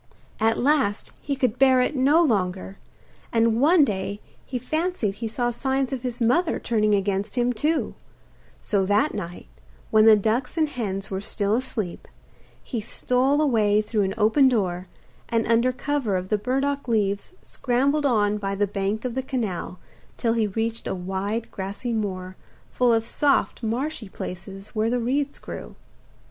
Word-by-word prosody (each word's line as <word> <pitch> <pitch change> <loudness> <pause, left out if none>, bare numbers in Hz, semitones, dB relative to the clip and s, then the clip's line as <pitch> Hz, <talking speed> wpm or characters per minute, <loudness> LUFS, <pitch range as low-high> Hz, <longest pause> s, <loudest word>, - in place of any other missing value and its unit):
At 225 +1 +2
last 265 -7 +1
he 280 - -2
could 255 -2 0
bear 260 -1 +6
it 250 +4 +1
no 285 +6 +4
longer, 190 - -1 0.5
and 230 0 +2
one 310 +1 +6
day 200 -2 -3 0.2
he 255 - -4
fancied 310 - -1
he 225 +3 -5
saw 240 +2 -1
signs 265 +2 -1
of 260 - -3
his 245 -1 -4
mother 315 +9 +2
turning 215 -3 +1
against 200 +2 -1
him 245 0 +1
too; 305 +8 0 0.7
so 200 -2 +1
that 210 +10 +2
night, 175 - -6 0.4
when 215 0 +6
the 220 -1 +9
ducks 225 - -1
and 310 -2 +2
hens 195 -8 -4
were 190 0 -2
still 205 0 -1
asleep, 225 -7 -4 0.6
he 235 -4 -4
stole 255 +6 +1
away 215 -8 +3
through 215 0 0
an 195 -1 -1
open 225 +6 +5
door, 185 -6 -1 0.4
and 230 -1 +1
under 235 +2 +3
cover 255 -4 -1
of 185 +1 -5
the 210 - +2
burdock 275 +4 -1
leaves 205 - 0
scrambled 275 +3 0
on 210 -4 +2
by 195 -1 -2
the 205 +1 +2
bank 200 +3 -2
of 250 - -2
the 265 - -1
canal, 220 -9 -3 0.4
till 230 -2 +1
he 225 -2 +1
reached 225 +3 -3
a - - -2
wide 195 +5 -3
grassy 200 +5 -4
moor, 185 -4 -3 0.4
full 250 -1 +3
of 225 -1 +2
soft 280 +3 +1
marshy 235 0 -3
places 195 +2 -8
where 220 0 0
the 245 - +1
reeds 275 +4 -1
grew. - - -8
230 Hz, 165 wpm, -24 LUFS, 205-260 Hz, 0.7 s, the